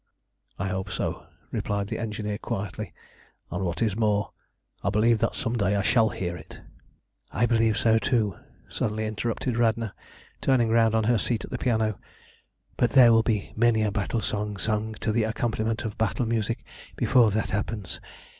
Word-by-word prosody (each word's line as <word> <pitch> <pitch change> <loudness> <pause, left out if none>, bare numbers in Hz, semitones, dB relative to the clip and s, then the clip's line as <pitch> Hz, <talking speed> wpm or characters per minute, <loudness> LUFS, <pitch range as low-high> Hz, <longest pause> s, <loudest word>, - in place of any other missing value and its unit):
"I 95 - -2
hope 95 0 -3
so," - - -3 0.2
replied 100 -1 -2
the - - -3
engineer 105 -2 -3
quietly, 105 -2 -4 0.6
"and, 90 +3 -2
what 85 +4 -1
is 105 -4 +1
more, 105 -2 +1 0.5
I 100 - +2
believe 110 +2 +3
that - - 0
some 125 -4 -1
day 100 -3 +1
I 100 - +1
shall 115 -1 +4
hear 90 -4 -3
it." - - -11 0.7
"I 120 - +2
believe 115 -2 +2
so 110 -1 +4
too," 110 -7 +1 0.3
suddenly 110 0 -2
interrupted 115 +3 -2
Radna, 115 -2 +1 0.5
turning 125 -4 +3
round 115 -1 +4
on 110 - +2
her 115 +1 +3
seat 115 +2 -1
at - - -15
the 125 - -3
piano, 110 -4 0 0.8
"but 120 - +3
there 120 -4 +8
will 115 - +6
be 110 -3 -1
many 115 -1 +3
a 105 - +1
battle 105 +2 -1
song 105 -1 -2
sung 110 +2 -1
to 110 - +1
the 115 +2 +2
accompaniment 110 +1 -1
of 110 - -5
battle 110 +3 +1
music 115 0 -1 0.3
before 125 -3 +4
that 105 +1 -1
happens. 105 0 -3
110 Hz, 175 wpm, -26 LUFS, 105-115 Hz, 0.8 s, there